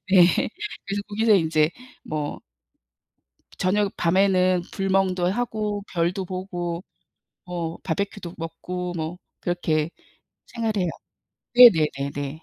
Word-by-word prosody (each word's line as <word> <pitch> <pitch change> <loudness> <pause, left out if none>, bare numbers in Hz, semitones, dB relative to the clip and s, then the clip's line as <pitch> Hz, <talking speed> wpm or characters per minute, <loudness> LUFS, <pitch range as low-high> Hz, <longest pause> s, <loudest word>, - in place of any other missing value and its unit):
네. 180 -2 +5 0.4
그래서 200 +1 -2
거기서 215 +1 +3
인제 160 -3 +3 0.3
뭐 150 -1 -3 1.2
저녁 200 +2 +1
밤에는 185 0 +3
불멍도 190 -2 +1
하고 215 -3 -2
별도 180 +2 0
보고 175 -2 -4 0.6
뭐 170 -2 -4
바비큐도 190 0 -3
먹고 175 +2 -5
뭐 160 +2 -4 0.2
그렇게 165 -3 0 0.6
생활해요. 215 -6 -1 0.7
네네네네. 150 - +5
180 Hz, 210 characters per minute, -24 LUFS, 165-200 Hz, 1.2 s, 네